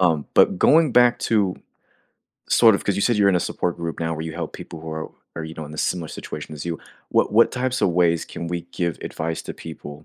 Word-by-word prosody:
Um, 80 -5 +2
but - - +5
going 155 -4 +5
back 120 -1 +5
to 100 -5 +1 0.9
sort 115 -3 +6
of - - -2
'cause 100 -1 0
you 100 - 0
said 120 0 +3
you're 100 -1 +4
in 90 - +4
a - - +1
support 90 - -2
group 85 -1 -5
now 80 0 -1
where 80 - -5
you 80 - -5
help - - -5
people 80 - -9
who 80 0 -7
are 80 0 -5 0.3
are, 80 - -4
you 80 0 -8
know, 80 - -6
in 75 - -10
the 75 - -9
similar 85 -4 -1
situation 75 0 -7
as 75 +3 -7
you, 85 -2 -3 0.3
what - - +2
what 115 +2 +5
types 130 0 -1
of - - +4
ways 85 -1 +2
can 85 - -6
we 85 -1 -3
give 85 -3 -2
advice 80 0 -3
to - - -7
people, 75 -2 -10
85 Hz, 250 wpm, -23 LUFS, 80-100 Hz, 0.9 s, sort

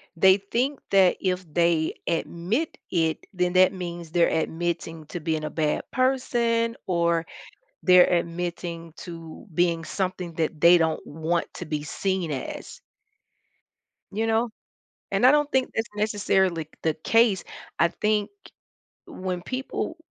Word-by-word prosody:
they 190 +3 +6
think 245 +8 -1
that 190 -2 +5
if 185 -1 -1
they 170 -2 +2
admit 175 - -1
it, 160 -2 0
then 180 -1 0
that 185 +1 +5
means 175 -3 -6
they're 170 0 +4
admitting 165 0 -2
to 175 - -5
being 155 -1 -2
a 155 - -2
bad 150 -1 0
person 235 -3 +1
or 170 -2 +1 0.6
they're 180 -1 +7
admitting 170 -1 -3
to 165 -2 -9
being 170 -1 +1
something 185 -2 -3
that 160 -1 -1
they 170 +1 +8
don't 160 -2 0
want 160 +3 -2
to 175 - -6
be 150 -1 -3
seen 185 +1 -2
as. 135 -3 -6 1.3
You 220 +3 -1
know? 225 +2 +2 0.6
And - - +3
I 255 - +9
don't 295 0 +2
think 260 -1 +1
that's 225 +1 -1
necessarily 190 -6 +1
the 160 - +2
case, 210 +5 +3 0.4
I 170 - +5
think 210 +4 0 0.8
when 185 - -4
people 265 - -4
175 Hz, 135 wpm, -25 LUFS, 165-210 Hz, 1.3 s, I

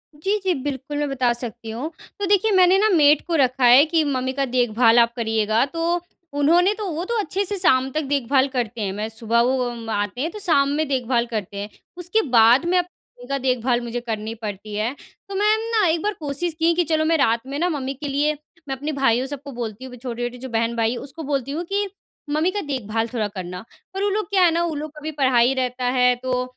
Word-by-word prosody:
जी, 390 +8 0
जी। 370 -2 +2
बिल्कुल, 285 0 -4
मैं 290 -1 -1
बता 250 -3 +1
सकती 235 -1 -7
हूँ। 250 +9 -4 0.3
तो 405 - -1
देखिए, 410 +2 +3
मैंने 370 0 +6
ना 430 +1 +3
मेड 295 -2 +5
को 340 - 0
रखा 260 -3 +2
है 250 +5 +8
कि, 320 0 +1
"मम्मी 260 -2 -1
का 275 0 0
देखभाल 240 -2 +3
आप 235 0 +3
करियेगा।" 220 -1 +1
तो 335 +4 -1 0.4
उन्होंने 345 +7 +4
तो 425 -3 -4
वो 330 +3 -3
तो 470 +3 -1
अच्छे 395 +1 -1
से 405 +1 -2
शाम 265 -7 +3
तक 310 - -1
देखभाल 270 0 +2
करते 240 -4 -3
हैं। 195 -2 -2
मैं 210 +2 -3
सुबह 230 +1 0
वो 255 +1 +1
उम, 230 -2 -7
आते 205 +2 -2
हैं, 320 - -1
तो 425 - -8
शाम 280 -8 +2
में 310 -1 0
देखभाल 250 -3 0
करते 205 -2 -4
हैं। 205 - -6 0.3
उसके 360 +5 0
बाद 235 +7 +6
में 360 +1 +2
मम्मी 345 -8 -9
का 275 - 0
देखभाल 250 -2 0
मुझे 240 0 -4
करनी 220 -2 -4
पड़ती 210 -1 -7
है। 220 +5 -1 0.4
तो 395 - -5
मैं 420 +2 +3
ना, 435 -3 +3
एक 325 0 +1
बार 420 - 0
कोशिश 305 +3 -3
की 335 +1 +3
कि 350 - +2
चलो, 315 -1 0
मैं 325 +1 +3
रात 230 -4 +1
में 275 +1 -4
ना 355 - +1
मम्मी 275 -4 -3
के 290 +2 -7
लिए, 290 +2 +1 0.3
मैं 270 - -2
अपने 290 +4 -4
भाइयों, 250 -1 +3
सबको 280 0 -7
बोलती 235 -1 -6
हूँ 260 - -9
कि - - -9
छोटे-छोटे 245 0 -5
जो 260 +1 -8
बहन-भाई, 230 0 0
उसको 285 +6 -8
बोलती 275 -2 -2
हूँ 320 +4 -3
कि, 405 0 0 0.4
"मम्मी 310 +5 +1
का 410 - -3
देखभाल 225 -3 -2
थोड़ा 220 -4 0
करना।" 180 -2 -7 0.3
और 390 - -1
वो 410 - +2
लोग 420 +2 -2
क्या 385 -3 +3
है 340 - +4
ना, 335 +1 +1
वो 320 - -3
लोग 300 +1 -5
का 300 0 -13
भी 315 - -3
पढ़ाई 255 -1 +4
रहता 250 0 -3
है, 250 0 +5
तो 250 0 -2
265 Hz, 235 wpm, -22 LUFS, 235-325 Hz, 0.4 s, है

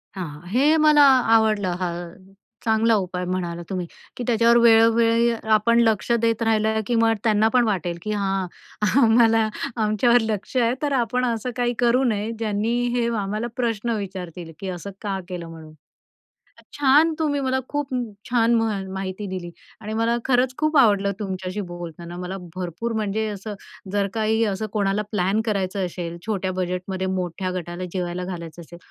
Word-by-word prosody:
हां, 180 -4 -4
हां. 150 +4 -12
हे 285 +7 +4
मला 305 -1 +5 0.3
आवडलं 210 -5 +2
हा 180 -1 -1 0.8
चांगला 225 0 +3
उपाय 180 -2 -2
म्हणालात 175 -2 -3
तुम्ही, 185 -2 -3 0.3
की 245 - -3
त्याच्यावर 235 0 +4
वेळोवेळी 230 0 +5 0.3
आपण 235 +2 +3
लक्ष 225 0 +2
देत 230 0 +1
राहिलं, 220 0 +2
की 240 - 0
मग 225 0 +4
त्यांना 215 -1 +3
पण 250 -1 +5
वाटेल, 175 -5 -1
की 215 - -4
हां, 195 -2 -1 0.5
आम्हाला 225 -1 +4 0.4
आमच्यावर 235 +3 +3
लक्ष 220 +2 -4
आहे 235 0 +3
तर 290 -1 0
आपण 250 0 +1
असं 235 +1 -2
काही 245 -1 0
करू 245 +2 +3
नये 220 -2 0
ज्यांनी 220 +1 -1 0.2
हे 235 -1 +1
आम्हाला 210 +4 -2
प्रश्न 230 -1 -1
विचारतील, 180 -4 -7
की 195 - -5
असं 185 +2 -6
का 195 -2 -2
केलं 175 -2 -6
म्हणून. 160 -1 -11 1.0
छान 295 +4 +4
तुम्ही 290 -2 0
मला 260 0 0
खूप 290 -1 -2 0.4
छान 235 -1 +3
मा 225 0 +2 0.3
माहिती 190 +1 -4
दिली 185 -2 -5 0.3
आणि 215 +1 -5
मला 230 +1 +1
खरंच 255 0 +2
खूप 310 0 +1
आवडलं 200 -5 +4
तुमच्याशी 190 0 -4
बोलताना 175 0 -8
मला 180 +2 -5 0.2
भरपूर 185 +6 -4
म्हणजे 215 0 -1
असं 205 +1 -6 0.4
जर 200 -1 +1
काही 220 0 +1
असं 205 +1 -2
कोणाला 200 0 +1
प्लॅन 200 +2 +1
करायचं 195 -2 -1
असेल 170 -1 -5
छोट्या 195 -4 -1
बजेटमध्ये 185 +1 -3
मोठ्या 185 +1 -3
गटाला 180 0 -5
जेवायला 180 -1 -3
घालायचं 170 -2 -7
असेल 170 +1 -12
210 Hz, 160 wpm, -23 LUFS, 185-230 Hz, 1.0 s, मला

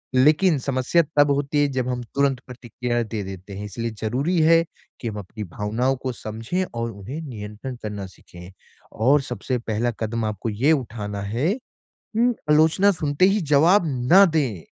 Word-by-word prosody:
लेकिन 155 +6 +4
समस्या 130 +5 +2 0.2
तब 145 0 +5
होती 145 +1 +1
है 145 - +3
जब 125 -1 0
हम 125 -1 -2
तुरंत 140 -2 +2
प्रतिक्रिया 120 -1 -3
दे 110 -1 -4
देते 95 +1 -8
हैं। 100 +1 -6
इसलिए 115 +3 -4
ज़रूरी 135 +11 0
है 165 +1 +5 0.4
कि 120 - -3
हम 105 -2 -4
अपनी 105 +3 -7
भावनाओं 110 +7 -1
को 130 - -1
समझें 115 +10 -3
और 115 0 -3
उन्हें 110 +10 -7
नियंत्रण 115 -2 -7
करना 105 -2 -4
सीखें। 90 -1 -14 0.4
और 135 +6 +3
सबसे 130 -1 -3
पहला 115 0 -1
कदम 115 0 -2
आपको 105 +1 -3
ये 120 +9 +2
उठाना 110 -8 -2
है। 115 - 0 0.7
हुँ। 240 +2 +3 0.2
आलोचना 160 +6 +5
सुनते 155 -1 0
ही 200 +2 +2
जवाब 170 +8 +6 0.3
ना 195 +2 +9
दें। 120 - 0
125 Hz, 165 wpm, -23 LUFS, 110-145 Hz, 0.7 s, ना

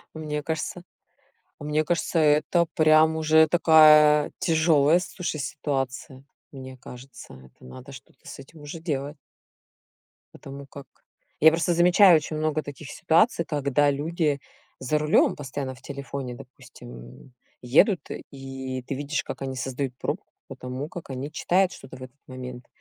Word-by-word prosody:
Мне 150 -1 -4
кажется 160 +3 -4 0.8
мне 150 +1 -1
кажется, 170 0 -1
это 155 +3 +3
прям 155 0 +4
уже 160 0 +4
такая 150 -2 +5
тяжёлая, 160 -1 +3
слушай, 180 -4 -5
ситуация. 135 -1 -4 0.3
Мне 130 -1 -10
кажется, 125 - -12
это 65 -1 -19
надо 130 - -12
что-то - - -15
с - - -9
этим 145 +3 -14
уже 145 +3 -8
делать. 145 -3 -4 1.2
Потому 140 0 -10
как 140 0 -12 0.5
я 160 - +8
просто 165 +1 0
замечаю 175 +1 +6
очень 155 0 -3
много 155 0 -1
таких 145 0 -10
ситуаций, 170 +2 +2
когда 145 -1 +1
люди 150 0 -2 0.4
за 140 +4 0
рулем 150 +1 +2
постоянно 135 -1 -6
в 125 - -18
телефоне, 140 -2 -7
допустим, 125 - -14 0.4
м, 125 - -21 0.3
едут, 155 - +3 0.3
и 135 -1 -7
ты 135 - -5
видишь, 145 +2 -3
как - - -7
они 135 -1 -4
создают 130 0 -4
пробку - - -4 0.2
по - - -9
тому, 130 +4 -6
как 170 -4 -10
они 135 +3 -5
читают 185 +1 +1
что-то 130 -1 -12
в - - -12
этот 130 +2 -12
момент. 125 -1 -9
145 Hz, 145 wpm, -25 LUFS, 135-160 Hz, 1.2 s, я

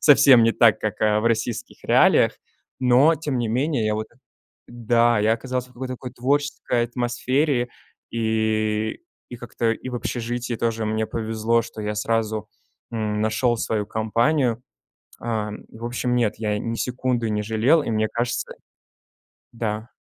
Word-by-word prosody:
совсем 140 -5 +7
не 115 - +3
так, 115 -3 +5
как 105 -1 -3
в 110 +1 +2
российских 120 +1 -2
реалиях, - - +4 0.5
но 130 +6 +4
тем 145 -3 -3
не 120 -2 -1
менее 130 0 0
я 110 - +1
вот 110 0 -3 0.6
да, 120 -1 +2
я 110 +2 +3
оказался 125 +1 -4
в 125 - -22
такой-то 130 +1 -5
какой 125 -1 -8
творческой 130 -2 0
атмосфере, 125 +2 0 0.4
и 110 -1 0 0.3
и - - -6
как-то 115 -1 -1
и 130 - -7
в - - -6
общежитии 120 0 -3
тоже 115 -1 -1
мне 110 0 0
повезло, 115 +1 0
что 110 - -8
я 105 0 -2
сразу, 110 0 -1 0.4
м, 105 -2 -2
нашёл 120 +2 +1
свою 110 -2 -1
компанию. 115 +3 +1 0.6
Э, 110 -2 -2 0.2
в 115 +1 -9
общем, 125 +1 -1
нет, 115 -4 +1
я 105 -2 -1
ни 115 - -3
секунды 125 -1 -1
не 105 0 -1
жалел, 115 +9 +3
и 115 - -3
мне 110 0 +1
кажется 120 0 -2 1.0
Да. 110 0 -3
115 Hz, 150 wpm, -23 LUFS, 110-125 Hz, 1.0 s, совсем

